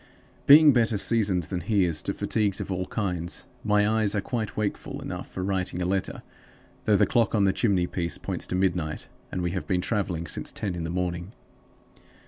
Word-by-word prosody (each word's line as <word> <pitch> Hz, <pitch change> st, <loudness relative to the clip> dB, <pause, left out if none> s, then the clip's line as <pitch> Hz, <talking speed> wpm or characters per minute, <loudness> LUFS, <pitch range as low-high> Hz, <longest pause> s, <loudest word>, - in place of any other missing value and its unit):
Being 150 Hz, 0 st, +9 dB
better 115 Hz, -3 st, +2 dB
seasoned 100 Hz, -4 st, +1 dB
than 90 Hz, +2 st, -4 dB
he 100 Hz, +2 st, +2 dB
is 80 Hz, -3 st, -1 dB
to -, -, -2 dB
fatigues 105 Hz, -3 st, 0 dB
of -, -, -4 dB
all 90 Hz, 0 st, -2 dB
kinds, 90 Hz, -5 st, -2 dB, 0.2 s
my 105 Hz, -1 st, +3 dB
eyes 110 Hz, -1 st, +1 dB
are -, -, +2 dB
quite 110 Hz, -1 st, -4 dB
wakeful 105 Hz, -2 st, -3 dB
enough -, -, -6 dB
for 90 Hz, -, -5 dB
writing 95 Hz, -2 st, -1 dB
a 90 Hz, -, -1 dB
letter, 95 Hz, +1 st, -2 dB, 0.6 s
though 105 Hz, -2 st, +4 dB
the -, -, +5 dB
clock 115 Hz, -2 st, +2 dB
on 105 Hz, -, +3 dB
the 95 Hz, -1 st, +3 dB
chimney 95 Hz, -6 st, +2 dB
piece 85 Hz, -1 st, -3 dB
points -, -, -4 dB
to -, -, -2 dB
midnight, 90 Hz, -4 st, -1 dB, 0.2 s
and 90 Hz, -, -2 dB
we 85 Hz, -, 0 dB
have 90 Hz, 0 st, -4 dB
been 90 Hz, -3 st, +1 dB
traveling 90 Hz, -6 st, -1 dB
since 75 Hz, -, -3 dB
ten 100 Hz, -3 st, -3 dB
in 85 Hz, -2 st, -4 dB
the -, -, -3 dB
morning. 90 Hz, +2 st, -3 dB
95 Hz, 200 wpm, -26 LUFS, 90-105 Hz, 0.6 s, Being